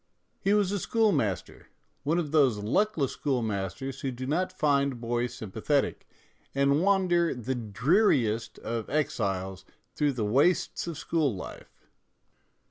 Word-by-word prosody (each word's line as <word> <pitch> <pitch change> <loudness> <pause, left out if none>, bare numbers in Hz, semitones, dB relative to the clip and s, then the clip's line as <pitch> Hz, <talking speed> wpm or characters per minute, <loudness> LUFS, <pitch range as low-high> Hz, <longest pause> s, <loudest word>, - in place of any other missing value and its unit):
He 200 +2 +2
was 205 -2 +2
a 205 - -1
school 220 +2 +2
master, 100 - -2 0.3
one 155 +4 0
of 160 -5 -1
those 140 -8 +4
luckless 140 - +1
schoolmasters 125 +1 -2
who 135 - -1
do 130 0 -5
not 175 +7 0
find 140 -7 +1
boys 120 +1 -2
sympathetic, 110 +7 -1 0.5
and 140 +2 +3
wander, 180 -4 +2
the 125 +2 -3
dreariest 120 - +1
of 115 -1 -4
exiles, 95 -10 -1 0.3
through 145 0 +1
the 115 -4 -2
wastes 140 - +2
of 165 -3 -4
school 155 -6 0
life. 90 - -10
135 Hz, 130 wpm, -28 LUFS, 115-165 Hz, 0.5 s, those